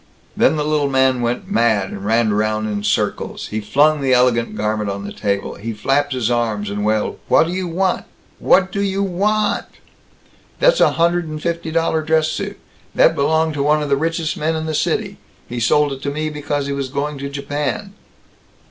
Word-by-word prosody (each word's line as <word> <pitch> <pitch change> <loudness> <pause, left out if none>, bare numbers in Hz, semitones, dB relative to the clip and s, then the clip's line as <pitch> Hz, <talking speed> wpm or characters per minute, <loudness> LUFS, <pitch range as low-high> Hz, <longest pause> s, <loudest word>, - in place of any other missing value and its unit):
Then - - +3
the 150 - -1
little 150 -2 +1
man 130 -2 +2
went 120 +10 -2
mad 110 - +2
and 100 - -7
ran 110 +1 +2
around 110 +1 0
in 105 -1 -3
circles. - - -1
He 110 +1 -3
flung 145 +8 +3
the 135 -1 +2
ellllegant 125 -2 +2
garment 105 0 -1
on 100 0 -4
the 100 - -6
table. 100 -1 -2
He 115 +3 -6
flapped 135 +6 0
his 120 -2 0
arms, 110 -4 -1
and 105 0 -3
wailed, 110 0 0
"What - - +5
do 170 - -4
you 185 -2 -3
vant? 185 +2 0 0.3
What 190 0 +3
do 200 - -2
you 195 0 0
vannnnt? 205 +3 0 0.9
That's - - +4
a - - +5
hundred 170 0 +1
and 155 0 -5
fifty 170 0 -3
dollar 165 0 +1
dress 160 0 +2
suit! - - -4 0.4
That - - +5
belonged 160 +2 +1
to 145 - -2
one 150 +1 +2
of 145 - -4
the 140 - +4
richest 165 +1 -1
men 160 +2 0
in 160 0 -3
the 160 - -3
city. - - -1 0.3
He 120 - -5
sold 145 +5 +2
it 135 - -9
to 140 - -2
me 155 +2 -3
because 145 -1 -2
he 140 - -2
was 140 -1 -3
going 145 +1 -3
to 140 0 -4
Japan." 145 +8 -3
145 Hz, 200 wpm, -19 LUFS, 115-160 Hz, 0.9 s, What